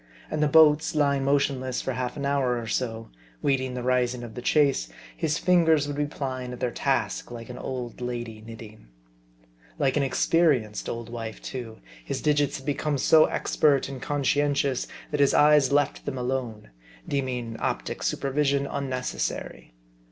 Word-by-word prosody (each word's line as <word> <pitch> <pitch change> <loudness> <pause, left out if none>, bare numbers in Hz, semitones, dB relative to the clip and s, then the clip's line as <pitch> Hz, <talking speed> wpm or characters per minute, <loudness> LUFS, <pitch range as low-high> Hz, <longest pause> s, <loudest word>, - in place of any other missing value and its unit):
And 150 - -1
the 150 - +4
boats 160 +1 +5
lying 140 -2 +2
motionless 135 -2 0
for 130 - -3
half 125 0 -3
an 140 - -3
hour 135 -3 +1
or 115 - -4
so, 115 0 -3 0.3
waiting 130 -2 0
the 125 - -4
rising 125 -1 +1
of 115 -2 -8
the 125 - -6
chase, 140 - +2 0.3
his 150 - 0
fingers 165 -5 +3
would 145 - -3
be 145 0 0
plying 130 -3 -4
at 125 - -8
their 125 - -1
task, - - -1
like 115 0 -8
an 125 - -8
old 125 -2 -5
lady 120 -3 -5
knitting. 110 - -11 0.9
Like 135 +1 +1
an - - +3
experienced 135 -4 +1
old 115 0 -5
wife 115 -2 -6
too, 120 - -7 0.2
his - - -3
digits 145 -1 +1
had 135 - -12
become 145 +1 -1
so 155 +4 +6
expert 140 -3 +1
and 135 -2 -7
conscientious, 145 -2 0 0.2
that 150 - -1
his 140 -1 +4
eyes 150 -2 +5
left 145 -1 +1
them 140 -2 -3
alone; 125 - -3 0.4
deeming 125 -4 -2
optic - - -3
supervision 140 0 0
unnecessary. 130 - -4
130 Hz, 160 wpm, -26 LUFS, 120-145 Hz, 0.9 s, so